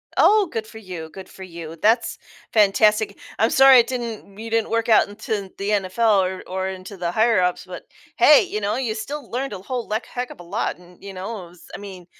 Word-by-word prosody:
Oh, 420 -2 +5
good 220 -1 -3
for 220 - -13
you, 180 -6 -8
good 190 +3 -11
for 190 - -11
you, 170 -3 -9
that's 225 +1 +2 0.4
fantastic. 210 0 +3 0.2
I'm 225 +2 +3
sorry 270 0 +7
it 235 - +2
didn't 235 -5 -6
you 225 +1 -6
didn't 225 -1 0
work 230 0 0
out 220 - +5
into 205 -2 -4
the 200 +1 -3
NFL 205 +1 +2
or 185 0 -4
or 190 +1 -3
into 190 +1 -8
the 175 -1 -2
higher 220 0 +3
ups, 180 0 -1
but 185 -1 -9 0.3
hey, - - +7
you 215 - -4
know, 205 +3 -1
you 240 -5 -2
still 275 +3 -6
learned 260 0 -3
a 195 - -6
whole 240 +4 -5
leck 215 +3 -2
heck 245 0 -5
of - - -12
a - - -10
lot 170 - -3
and, 180 0 -19
you 200 -1 -8
know, 190 +1 -6
it - - -15
was 175 0 -17
I - - -5
mean 190 -3 -10
210 Hz, 230 wpm, -22 LUFS, 185-230 Hz, 0.4 s, sorry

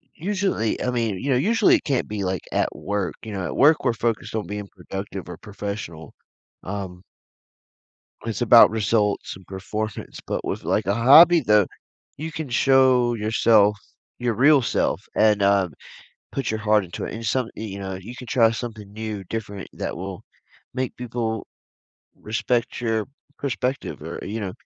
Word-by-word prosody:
Usually, 185 - -1
I - - 0
mean, 115 -5 -1
you 140 - -3
know, - - +4
usually, 230 - +4
it 320 - -1
can't 135 -5 0
be, 105 -1 -3
like, 95 -1 -1
at - - 0
work, 100 -3 -3
you 110 - -7
know, 95 -2 -3
at - - -4
work, 150 +3 +5
we're 125 -3 +2
focused 115 -1 -2
on 105 -6 -2
being 105 0 -5
productive 95 0 -7
or 90 - -7
professional, 100 -6 -7 0.5
um 95 -2 -6 1.2
it's 115 -2 -3
about 120 -1 +8
results 105 -1 0
and 95 - -17
performance, 100 +2 -5
but - - -2
with, - - -3
like, - - +1
a 100 - +2
hobby, 150 +10 +8
though, 105 -5 +4 0.5
you 160 +2 -5
can 155 -3 -5
show 130 -1 +4
yourself, 110 -1 +3 0.4
your 120 -1 0
real 140 +4 +5
self - - 0
and, 105 -1 +4
um, 100 -3 +3 0.6
put 135 - -2
your 110 0 -2
heart 105 -2 +3
into 85 - -6
it, - - -5
and 115 - -7
some 120 +3 0
you 105 -3 -6
know, 95 -1 -5
you 115 +6 -9
can 125 - -9
try 115 -2 +4
something 110 -3 -6
new, 110 -2 -5
different 105 0 -5
that - - -4
will 95 +1 -6 0.5
make 130 0 -2
people 115 -3 -3 0.7
respect 115 +3 -1
your 110 -3 0 0.3
perspective 135 -1 -3
or, 80 +2 -6
you 110 +3 -4
know, 95 -3 -4
110 Hz, 170 wpm, -23 LUFS, 100-125 Hz, 1.2 s, about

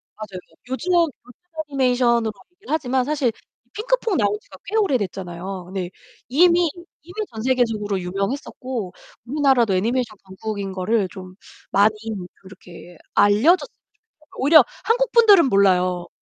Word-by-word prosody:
맞아요. 205 -4 -8 0.3
요즘 330 +8 -2
요즘 335 -4 +3 0.6
애니메이션으로 245 -4 +2 0.2
얘기를 395 -5 -7
하지만 260 -4 0
사실 280 -5 0 0.4
핑크퐁 460 - 0
나온 210 -2 +1
지가 - - -15
꽤 410 +2 -5
오래 385 -12 +3
됐잖아요. 185 -2 -6
네. 185 -2 -4 0.4
이미, 340 +5 +4 0.3
이미 355 +2 -13 0.2
전 220 - -6
세계적으로 225 -6 0
유명했었고, 200 +2 -4 0.3
우리나라도 265 -7 +2
애니메이션 225 +2 -1
강국인 200 +1 -5
거를 195 +2 0
좀 185 -1 -10 0.4
많이 210 +2 +4 0.5
이렇게 180 -2 -13 0.2
알려졌으면 210 - +5 0.2
좋겠어요. 425 -8 -34
오히려 285 -1 +6 0.2
한국분들은 455 - +5
몰라요. 185 -3 +2
235 Hz, 345 characters per minute, -22 LUFS, 195-300 Hz, 0.6 s, 오히려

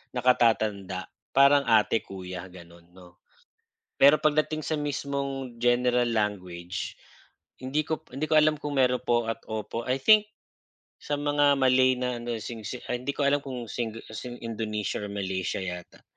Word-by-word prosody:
nakatatanda 110 -6 +2 0.3
parang 140 +1 +6
ate, 110 0 +4
kuya 95 -1 -8
gano'n 85 -1 -15
'no. 90 -1 -16 0.8
Pero 145 +2 +7
pagdating 155 0 +1
sa 160 - -1
mismong 140 -3 -3
general 120 0 +3
language 90 -4 -3 0.7
hindi 140 +4 0
ko 160 -2 -3
hindi 140 +4 -2
ko - - +3
alam 155 0 +4
kung 145 -1 -4
meron 125 -1 +3
po 120 -2 +1
at - - -5
opo. 110 +1 -4
I 130 - +2
think 215 +3 +6 0.8
sa 145 - -2
mga 145 -1 +3
Malay 130 0 +4
na 125 -1 -1
ano 120 0 -4
ay - - -7 0.6
hindi 130 +3 -3
ko 145 - -1
alam 145 +1 +2
kung 125 -3 -6
sing 115 -1 -3 0.5
Indonesia 110 -2 -3
or 105 - -5
Malaysia 95 -2 -2
yata 90 -1 -7
125 Hz, 145 wpm, -27 LUFS, 105-140 Hz, 0.8 s, Pero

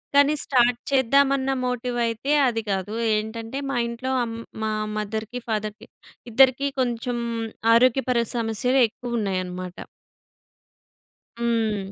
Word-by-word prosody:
కానీ 285 +1 +6
స్టార్ట్ 245 -2 +3
చేద్దామన్న 270 +1 +3
మోటివైతే 245 +1 -1 0.2
అది 225 -2 0
గాదు. 195 +2 -2 0.2
ఏంటంటే, 225 +4 -4
మా 275 - -2
ఇంట్లో 240 +3 -4
అమ్ 230 -1 -4 0.3
మా 220 - 0 0.3
మదర్‌కి, 220 +3 -4
ఫాదర్‌కి 215 0 -3 0.4
ఇద్దరికీ 265 +3 +4
కొంచెం 240 0 -2 0.6
ఆరోగ్యపర 255 +1 +3 0.2
సమస్యలెక్కువున్నాయన్నమాట. 220 -6 -1 1.6
హ్మ్. 220 -4 -1
235 Hz, 90 wpm, -24 LUFS, 220-255 Hz, 1.6 s, కానీ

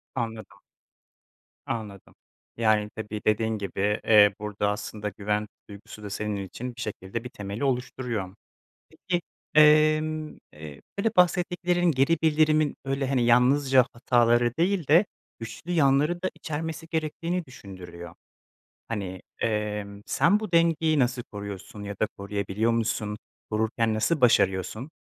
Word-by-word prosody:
Anladım. 115 -3 -5 1.0
Anladım. 105 -4 -6 0.4
Yani, 110 -2 +2
tabii, 105 -1 -5
dediğin 110 +1 +1
gibi, 100 +1 -1
eee, 105 -2 +6
burada 105 -1 -2
aslında 105 0 -4
güven 105 +1 -2 0.2
duygusu 105 +1 -11
da 105 - -6
senin 105 +1 -3
için 120 +6 -7
bir 125 - -8
şekilde 105 +1 -5
bir 125 - -7
temeli 100 0 -6
oluşturuyor. 125 -7 -2 0.6
Peki, 175 +2 -3 0.3
emm, 155 +1 +4 0.2
eee, 75 -2 -10 0.2
böyle 225 +3 +2
bahsettiklerinin, 180 -1 +2
geri 140 +5 +2
bildirimin, 155 -1 +3
böyle, 135 0 -1
hani, 130 -3 +1
yalnızca 130 +2 +4
hataları 120 -1 +3
değil 180 -1 +1
de 165 +7 +6 0.3
güçlü 115 +8 -8
yanları 150 +2 +2
da 185 - 0
içermesi 160 +1 -5
gerektiğini 165 +2 -2
düşündürüyor. 90 -8 -10 0.7
Hani, 95 -5 -4 0.2
emm, 105 -2 -2
sen 185 +9 +3
bu 215 -4 -6
dengeyi 165 -2 +3
nasıl 125 -1 +1
koruyorsun 100 -1 -8
ya 100 0 -5
da 110 - +3
koruyabiliyor 100 +2 -1
musun? 110 -2 -1 0.3
Korurken 110 +1 0
nasıl 140 +9 +1
başarıyorsun? 110 - +2
115 Hz, 125 wpm, -26 LUFS, 105-155 Hz, 1.0 s, eee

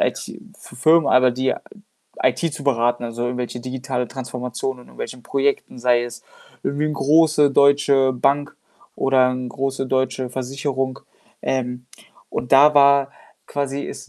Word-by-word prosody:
IT-F - - -5
Firmen, 160 +2 +4
aber 130 0 +5
die 130 +2 -1 0.7
IT - - +2
zu 145 -2 -7
beraten, 120 -2 +1
also, 120 0 -5
irgendwelche 125 0 -3
digitale 125 0 -4
Transformation 125 0 -5
in - - -13
irgendwelchen 125 -1 -8
Projekten, 140 -1 -1
sei 120 0 +2
es 120 0 -8 0.4
irgendwie 145 +2 -1
'n 155 - -2
große 150 0 +3
deutsche 140 -1 +4
Bank 140 +3 0 0.4
oder 130 -1 +3
'n 125 -1 -4
große 135 +1 -3
deutsche 130 -1 -1
Versicherung. 130 +1 -3 0.4
Ähm, 125 -1 -3 0.4
und 125 - -4
da 145 +2 +7
war 140 -1 +5 0.3
quasi 140 0 -3
es - - -9
130 Hz, 135 wpm, -21 LUFS, 125-140 Hz, 0.7 s, da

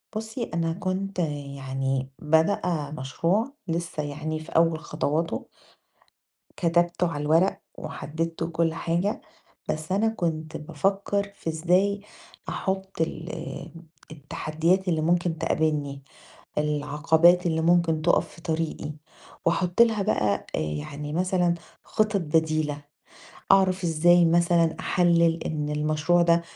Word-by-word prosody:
بُصّي، 220 +3 -4
أنا 165 -1 0
كنت 190 +1 -3 0.4
يعني 135 0 -2
بادئه 160 -1 +1
مشروع 175 - 0
لسّه 170 -2 -2
يعني 150 +2 -4
في 155 - -11
أول 165 -1 +4
خطواته. 160 +1 -2 1.1
كتبته 175 +1 +2
على 145 - -3
الورق 175 +6 +3 0.2
وحدِّدته 165 +2 -4
وكل 165 0 0
حاجة، 175 +7 -1 0.5
بس 155 +2 -3
أنا 210 +4 +3
كنت 160 -6 -3
بافكّر 195 +6 -1
في 165 - -5
إزاي 180 +5 +2 0.5
أحُط 190 -2 -3
ال 160 +1 -2 0.8
التحدّيات 160 +5 -1
اللي 165 -3 +1
ممكن 170 +1 +1
تقابلني، 145 -3 -1 0.5
العقبات 150 +4 +3
اللي 160 -1 +1
ممكن 170 -1 +3
تُقَف 175 +2 +3
في 170 - -15
طريقي 160 -2 -2 0.5
وأحُط 175 +4 +2
لها 225 -3 +4
بقى 105 - +1
آآ - - -1
يعني 80 - -4
مثلًا 180 0 +2 0.3
خِطَط 215 -1 +1
بديلة، 155 -2 +1 0.7
أعرف 190 -1 +4
إزاي 175 +1 +5
مثلًا 170 0 +3
أحلِّل 170 -2 +3
إن 150 -1 -2
المشروع 155 +3 +2
ده 170 0 +4
165 Hz, 115 wpm, -26 LUFS, 155-180 Hz, 1.1 s, إزاي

